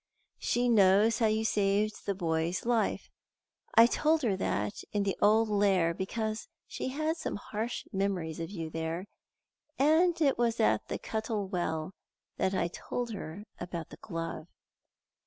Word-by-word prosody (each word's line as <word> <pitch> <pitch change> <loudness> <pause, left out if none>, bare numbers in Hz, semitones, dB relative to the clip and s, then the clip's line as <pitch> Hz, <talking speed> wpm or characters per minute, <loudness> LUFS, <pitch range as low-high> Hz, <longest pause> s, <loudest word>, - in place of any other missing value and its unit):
She 245 +1 +1
knows 215 0 +5
how 225 - +4
you 220 +1 +1
saved 205 0 +1
the 200 - 0
boy's 165 0 -1
life. 235 -2 0 0.6
I 230 0 +9
told 305 +5 +2
her 215 -5 +2
that 105 - -2
in 205 -1 +1
the 195 -1 0
old 220 +2 +5
Lair 195 -5 +3
because 215 +4 -3 0.2
she - - -5
had 310 +5 -1
some - - -3
harsh 220 +3 -4
memories 190 -5 -1
of 165 - -4
you 165 -5 -5
there; 165 +3 -3 0.7
and 320 +5 +4
it 280 -6 +2
was 235 -1 +1
at 220 - +2
the - - -3
Cuttle 220 -2 -3
Well 175 -2 -2 0.4
that 190 +1 +1
I 170 - +1
told 240 +7 -4
her 200 -2 -6 0.2
about 170 -3 -5
the - - -10
glove." 165 -4 -5
205 Hz, 155 wpm, -30 LUFS, 175-230 Hz, 0.7 s, I